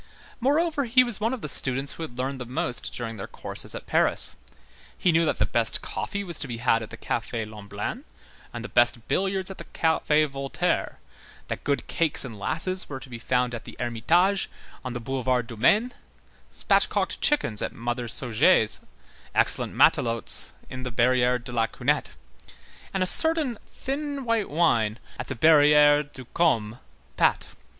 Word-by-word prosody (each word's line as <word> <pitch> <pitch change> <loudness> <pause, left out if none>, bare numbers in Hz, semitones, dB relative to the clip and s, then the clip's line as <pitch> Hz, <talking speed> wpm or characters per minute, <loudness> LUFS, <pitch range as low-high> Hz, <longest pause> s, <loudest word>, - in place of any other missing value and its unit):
Moreover, 295 +3 +1
he 255 +2 +5
was 240 -5 -3
one 225 +2 0
of 260 -3 -4
the - - -2
students 135 0 0
who - - -10
had 150 -7 -7
learned 130 +1 -3
the - - -4
most 125 0 -3
during 115 -2 -5
their 95 - -6
course - - -2
at - - -7
Paris; - - +2 0.6
he 180 - +2
knew 165 +1 +3
that - - 0
the - - +2
best 115 -2 0
coffee 200 -1 -4
was 170 -5 -2
to 150 - -2
be 120 -2 -5
had 115 -1 +2
at 110 - -7
the - - -10
Café 115 -2 -3
Lemblin, 105 -1 -6 0.5
and 120 -1 -7
the - - -4
best 120 -2 +2
billiards 190 0 0
at 190 - -10
the - - -6
Café 155 -2 +1
Voltaire, 135 -1 -2 0.5
that - - -4
good 140 -1 -1
cakes 160 -4 +1
and 115 -5 -9
lasses 185 - 0
were 135 -2 -5
to 130 - -13
be 120 - -7
found 125 +1 0
at 115 - -6
the - - -11
Ermitage, 165 - +1 0.3
on 130 -2 -5
the 120 - -4
Boulevard 125 0 -1
du 115 -1 -9
Maine, 210 - +3 0.6
spatchcocked - - 0
chickens 115 - +1
at - - -2
Mother 120 +1 -4
Sauget's, 115 -1 +3 0.6
excellent - - +2
matelotes 115 -2 +2 0.2
at 130 0 -6
the 125 - -4
Barrière 125 +1 +2
de 125 - -8
la 115 -2 +1
Cunette, - - -1 0.8
and 190 -1 0
a - - +1
certain 305 - +4
thin 280 0 -5
white 230 -3 0
wine 120 -9 +2 0.2
at - - -5
the 130 - -4
Barrière 150 +1 +5
du 130 -3 -9
Compat. 105 - -1
130 Hz, 175 wpm, -25 LUFS, 120-185 Hz, 0.8 s, he